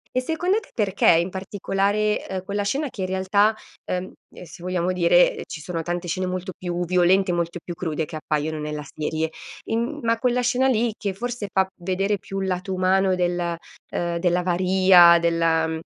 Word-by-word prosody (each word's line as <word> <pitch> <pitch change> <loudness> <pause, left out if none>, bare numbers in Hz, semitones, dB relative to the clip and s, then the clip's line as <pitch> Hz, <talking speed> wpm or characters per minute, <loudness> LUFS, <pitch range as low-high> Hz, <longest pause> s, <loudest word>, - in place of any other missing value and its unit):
E 255 - +2
secondo 350 +9 0
te 410 - -18
perché 205 -4 +2
in 170 +2 +3
particolare, 200 +2 -1
uhm, 190 -1 -4
quella 200 +1 -2
scena, 275 +9 -1
che 195 - -7
in 185 - -1
realtà, 195 +3 +2 0.3
ehm, 185 +1 -4 0.3
se 175 +1 -13
vogliamo 180 0 -1
dire 175 0 +3
ci 160 - -7
sono 165 +1 -4
tante 175 +2 -4
scene 185 +2 -2
molto 185 +1 -4
più 175 -1 -3
violente, 180 +2 +3
molto 170 0 -2
più 175 - -6
crude 160 -2 -3
che 160 -1 -7
appaiono 155 0 -2
nella 150 0 -4
serie, 155 +1 -3 0.3
in, 225 - -1
mhmm 290 +5 -4
ma 230 0 +1
quella 250 0 +1
scena 250 +2 +2
lì 235 -3 +1
che 200 -2 -2
forse 240 -1 -4
fa 190 0 +2
vedere 195 +3 0
più 195 +2 -6
il - - -1
lato 185 +1 -2
umano 185 0 +2
del, 175 -1 -1 0.3
uhm 170 -1 -2
dell'avaria, 180 0 +5
della 165 -1 +2
mhmm, 160 0 -3
185 Hz, 185 wpm, -23 LUFS, 170-200 Hz, 0.3 s, dell'avaria